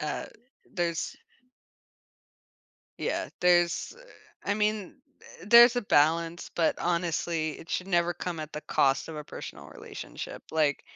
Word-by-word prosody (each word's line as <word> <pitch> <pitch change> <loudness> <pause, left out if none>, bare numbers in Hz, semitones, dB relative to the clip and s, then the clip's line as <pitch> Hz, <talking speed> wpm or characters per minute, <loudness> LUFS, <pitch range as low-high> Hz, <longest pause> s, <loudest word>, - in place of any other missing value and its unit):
uh, 150 0 -3 0.5
there's 170 -2 -2 1.8
Yeah, - - -2
there's, 175 - +3
eh, - - -14
I - - +4
mean, 210 -2 -1 0.5
eh, - - -11
there's 235 +2 +9
a 245 - +1
balance, 165 0 +2
but, 165 -2 +2
honestly, 170 -2 -1
it 165 - -13
should 185 - -2
never 175 -1 +2
come 175 -2 -5
at 155 0 -6
the 150 - -5
cost 135 +2 +1
of 160 - -7
a 150 - -6
personal - - -9
relationship. - - -8
Like 150 -3 +1
170 Hz, 135 wpm, -28 LUFS, 155-185 Hz, 1.8 s, there's